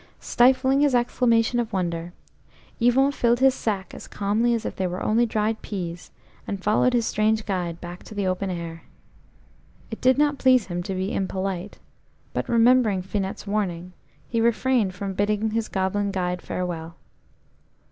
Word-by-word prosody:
Stifling 260 +2 +3
his 285 -3 +3
exclamation 240 -1 +2
of 230 -1 -2
wonder, 175 -3 -2 0.7
Yvon 255 +4 +4
filled 240 -3 +1
his 265 0 +5
sack 200 -6 -3
as - - -10
calmly 220 +4 +1
as 230 - -4
if - - -4
they 190 - -1
were 180 +1 -4
only 235 +2 +2
dried 215 0 -1
peas, 175 -4 -6 0.4
and 195 -2 -4
followed 215 +4 +3
his 235 -2 +2
strange 215 0 +1
guide 175 -4 -3
back 175 +1 -8
to 215 - -10
the 200 -1 -1
open 185 +1 -1
air. 170 -2 -5 1.1
It 225 - -6
did 255 +1 +4
not 290 -1 +2
please 255 -4 +4
him 175 -1 -4
to 190 +2 -4
be 190 +2 -2
impolite, 190 0 -3 0.6
but - - -3
remembering 230 -4 +4
Finette's 195 +1 -4
warning, 185 -4 -2 0.3
he 230 -1 0
refrained 235 -3 +1
from 195 +1 -4
bidding 210 +2 0
his 225 0 -1
goblin 195 +1 -1
guide 180 -2 -2
farewell. 170 -2 -4
205 Hz, 160 wpm, -24 LUFS, 185-235 Hz, 1.1 s, his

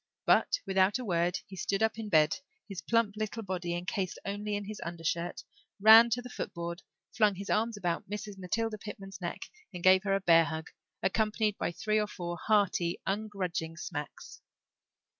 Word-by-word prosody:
But - - +3
without 190 +2 +3
a 255 - -6
word 175 -2 +1
he 195 - -11
stood 195 +3 -1
up 220 0 +1
in 215 -2 -5
bed, 155 -4 +4 0.3
his 195 -3 -6
plump 230 -3 +1
little 215 +1 -4
body 180 -3 -3
encased 185 +1 -3
only 205 +1 -3
in 205 0 -4
his 210 +1 -7
undershirt, 170 +1 -3 0.4
ran 220 +3 +9
to 245 +2 -1
the 250 - -8
footboard, 170 -3 -5 0.3
flung 210 -3 +4
his 200 +2 -5
arms 225 +1 +1
about 175 -2 -2
Mrs. 210 0 -5
Matilda 215 +4 -2
Pitman's 195 -2 -9
neck, 175 - -4 0.3
and 180 -3 -8
gave 185 0 +7
her 195 -1 +1
a - - +1
bear 165 -3 +5
hug, 160 0 -5 0.3
accompanied 215 0 +1
by - - -1
three 215 +5 0
or 210 - 0
four 175 -3 -5
hearty, 200 -5 +2
ungrudging 190 -5 -3
smacks. 150 -3 -7
195 Hz, 175 wpm, -30 LUFS, 175-215 Hz, 0.4 s, ran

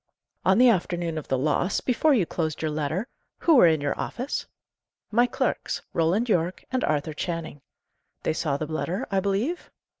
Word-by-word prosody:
"On 190 +1 +4
the 250 +2 +7
afternoon 175 -6 +1
of 150 - -11
the 130 - +1
loss, 155 +7 +1
before 265 +5 +2
you 200 -8 +2
closed 160 -2 -3
your 155 - 0
letter, 155 - -2 0.3
who 335 - +3
were 240 - +8
in 160 -2 +2
your 145 -1 -1
office?" 255 +4 -3 0.6
"My 240 +3 +4
clerks - - -2
Roland 175 +9 +2
Yorke 180 -4 0
and 255 0 0
Arthur 150 0 0
Channing." 165 -3 -4 0.6
"They - - +1
saw 150 -3 -1
the 155 - -3
letter, 170 - -3
I 195 - +2
believe?" 205 - -1
175 Hz, 175 wpm, -26 LUFS, 155-225 Hz, 0.6 s, were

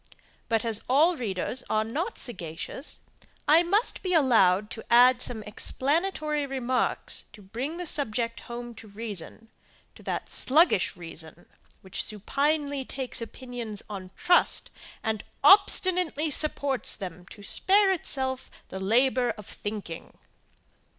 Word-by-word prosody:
But, 225 -1 +1
as 225 -2 +1
all 310 +7 +5
readers 235 - -2
are 215 0 +2
not 310 - -3
sagacious, 180 - -7 0.5
I 315 +3 +7
must 395 +7 +1
be 365 -1 -1
allowed 215 - +4
to 225 - -7
add 245 +1 +6
some 225 -4 -1
explanatory 300 - -1
remarks 260 -2 0
to 210 - -13
bring 245 - -5
the 355 - -4
subject 235 -6 -1
home 240 0 -7
to 220 - -11
reason 215 +1 -7 0.4
to - - -16
that - - -3
sluggish 295 - +3
reason, 165 0 -10 0.4
which 190 - -4
supinely 280 +6 -1
takes 260 -2 -2
opinions 235 -3 -6
on 190 -2 -6
trust, 355 -1 +2 0.3
and 220 -2 -2 0.2
obstinately 360 -3 +4
supports 280 -4 0
them 180 -3 -8
to 205 - -13
spare 390 - +3
itself 265 -7 -2 0.2
the 190 - -6
labour 245 +5 +3
of 210 - -10
thinking. 205 -6 -7
245 Hz, 125 wpm, -27 LUFS, 210-295 Hz, 0.5 s, I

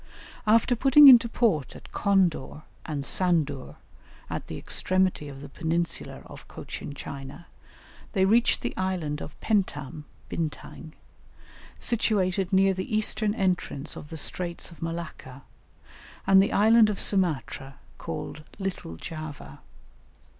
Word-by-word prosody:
After 230 +3 +4
putting 275 +4 +7
into 235 -2 +7
port 200 - 0
at - - -13
Condor 185 -7 +1 0.2
and 145 -3 -3
Sandur, 155 -8 +1 0.6
at - - -4
the - - -6
extremity 185 -5 0
of 135 -1 -9
the 145 - -8
peninsular 165 +3 -3
of - - -13
Cochin 145 - -8
China, 140 +4 -8 0.7
they 190 -2 +3
reached 230 +5 +3
the - - -4
island 175 -6 -2
of 150 - -9
Pentam 155 - -1 0.2
(Bintang), 160 0 -6 0.8
situated 195 -5 0
near 195 0 +4
the 185 +3 -2
eastern 215 0 +1
entrance 180 -7 -2
of - - -9
the 160 - -6
straits 170 +3 -4
of 170 - -15
Malacca, 165 -6 -6 0.8
and 195 0 +6
the 200 - +1
island 220 +1 +5
of 205 - -3
Sumatra, 155 -7 -1 0.2
called 155 - -6
Little 190 - -5
Java. 155 - -8
180 Hz, 125 wpm, -26 LUFS, 150-200 Hz, 0.8 s, putting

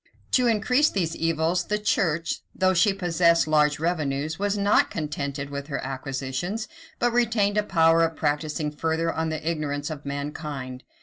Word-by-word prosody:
To 250 -2 +3
increase 250 +6 +3
these 170 -4 -1
evils, 165 +2 0
the 210 - 0
Church, 170 -6 0 0.2
though 185 0 +3
she 200 +4 +4
possessed 170 -3 +2
large 150 -1 +3
revenues, 155 -2 -1
was 205 0 0
not 200 +1 +3
contented 140 -2 -4
with 140 0 -5
her 140 - -3
acquisitions, 135 - -4 0.3
but 240 0 +1
retained 220 -4 +2
a - - +4
power 165 -4 +3
of 165 -1 +1
practising 150 0 -1
further 160 +2 -1
on 160 0 -1
the 155 0 -4
ignorance 150 -2 -2
of 145 -2 -7
mankind. 140 -2 -5
160 Hz, 160 wpm, -25 LUFS, 145-190 Hz, 0.3 s, she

